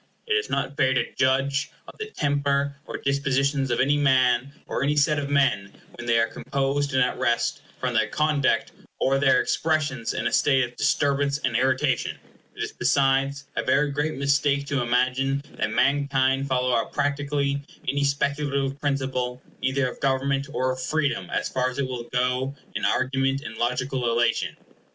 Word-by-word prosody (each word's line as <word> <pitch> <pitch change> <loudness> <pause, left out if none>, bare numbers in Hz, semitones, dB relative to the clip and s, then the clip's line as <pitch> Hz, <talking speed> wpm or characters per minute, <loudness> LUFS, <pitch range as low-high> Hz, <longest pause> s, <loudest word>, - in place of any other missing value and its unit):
It 445 - 0
is 435 0 0
not 135 +2 -2
fair 130 -1 +2
to 120 - -1
judge 135 +2 +1 0.2
of - - -10
the 435 - -4
temper 140 - 0
or - - -4
dispositions 140 0 0
of 120 - 0
any 145 +2 +3
man, 130 -2 +3
or - - -3
any 145 +2 +1
set 150 +1 +3
of 140 -1 -4
men, 135 -9 +1
when 120 - -9
they 115 0 +3
are 115 - +4
composed 140 +3 -2
and 130 - +5
at 125 - -2
rest, 120 +4 0 0.2
from 125 -1 -1
their 110 -1 +2
conduct 150 +2 +1 0.3
or 135 +1 +2
their 135 -2 +4
expressions 155 -7 0
in - - -2
a - - 0
state 135 -3 +4
of 125 0 -5
disturbance 140 0 +1
and 130 -5 -2
irritation. 130 +2 +1 0.4
It - - -3
is - - -4
besides 135 +2 +1
a - - +1
very 145 0 +2
great 145 +2 -1
mistake 140 +1 +1
to 140 -2 0
imagine 130 +3 +1 0.2
that - - +1
mankind 135 -1 +2
follow 125 -1 +1
up 115 -2 0
practically 140 -1 0 0.3
any 140 +1 +1
speculative 140 0 -1
principle, 130 -3 -1 0.2
either 130 0 +1
of - - -7
government 135 +1 0
or 130 -2 0
of 130 0 -5
freedom, 140 - -1
as - - -1
far 130 -1 0
as 125 - -8
it 140 -2 0
will 125 -2 -5
go 125 +2 0 0.2
in - - -2
argument 135 +1 +1
and 110 - -8
logical 125 +1 -1
illation. 120 +1 +1
135 Hz, 175 wpm, -25 LUFS, 130-140 Hz, 0.4 s, and